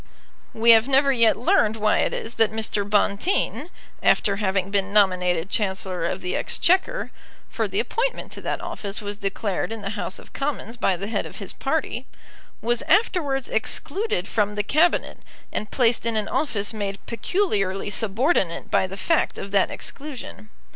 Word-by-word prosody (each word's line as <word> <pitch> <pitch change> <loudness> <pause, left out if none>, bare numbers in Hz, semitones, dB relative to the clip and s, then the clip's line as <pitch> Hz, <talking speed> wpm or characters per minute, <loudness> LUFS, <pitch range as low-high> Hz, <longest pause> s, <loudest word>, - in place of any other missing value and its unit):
We 230 +1 +6
have 225 +1 +6
never 275 +1 +4
yet 230 -4 +4
learned 220 -2 +3
why 215 -1 +2
it - - +1
is 225 - -4
that 220 - +5
Mr. 220 -2 -1
Bonteen, 215 - +1 0.3
after 200 -1 +3
having 195 -2 0
been 200 -1 0
nominated 180 -4 +3
Chancellor 190 -4 -1
of 180 +2 -2
the 180 - -2
Exchequer, 380 +8 +1 0.4
for - - -1
the - - -2
appointment - - -2
to - - -7
that - - -3
office 200 -1 -5
was 205 0 -6
declared 200 +1 -2
in 225 -2 -5
the 200 - -3
House 205 -2 -3
of - - -14
Commons 275 -5 -3
by 195 -6 +1
the 195 - -4
head 220 - -2
of - - -12
his - - -6
party, - - -2 0.6
was 240 +1 +1
afterwards 295 - +2
excluded 280 - -1
from 210 -1 0
the 210 - 0
Cabinet, 315 - +2 0.3
and 210 - -3
placed 240 -2 +2
in 230 - 0
an 215 -1 0
office 230 -6 -1
made 200 -2 -3
peculiarly 210 - -1
subordinate 215 - 0
by 190 - +3
the 195 +1 -8
fact 330 - +1
of 195 - -6
that 195 -1 +3
exclusion. 265 -7 -6
215 Hz, 170 wpm, -24 LUFS, 195-265 Hz, 0.6 s, We